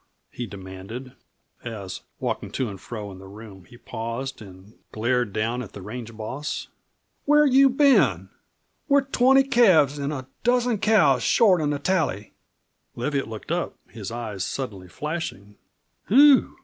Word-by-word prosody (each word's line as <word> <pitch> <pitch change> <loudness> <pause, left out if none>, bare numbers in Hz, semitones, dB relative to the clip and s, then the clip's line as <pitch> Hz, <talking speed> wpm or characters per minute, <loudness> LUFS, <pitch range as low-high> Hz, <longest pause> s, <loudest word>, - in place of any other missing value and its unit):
he 120 - -6
demanded, 100 +6 -9 0.5
as, 100 -6 -6 0.2
walking - - -3
to 130 - -2
and 95 -2 -9
fro 105 -4 -7
in 95 - -11
the 95 - -12
room, 100 -2 -12
he 120 - -16
paused 120 +3 -5
and 95 +1 -14 0.2
glared 120 0 0
down 115 +4 -1
at 110 - -9
the 100 - -9
range 115 +1 -8
boss. 130 +7 -5 0.6
"Where 295 +1 +5
you 275 0 +6
been? 275 +1 +3 0.6
We're 280 -1 +4
twenty 270 0 +4
calves 185 - +4
an' 140 +1 -2
a 130 -4 -5 0.2
dozen 245 -2 +2
cows 195 - +4
short 190 -7 +4
on 150 - 0
the 145 - -1
tally!" 145 - -1 0.6
Leviatt 135 +2 -2
looked 110 -1 -8
up, - - -2 0.2
his 105 -4 -7
eyes 110 -5 -5
suddenly 100 -7 -5
flashing. 150 - -5 0.5
"Whew!" 275 +4 +6
125 Hz, 150 wpm, -24 LUFS, -, 0.6 s, you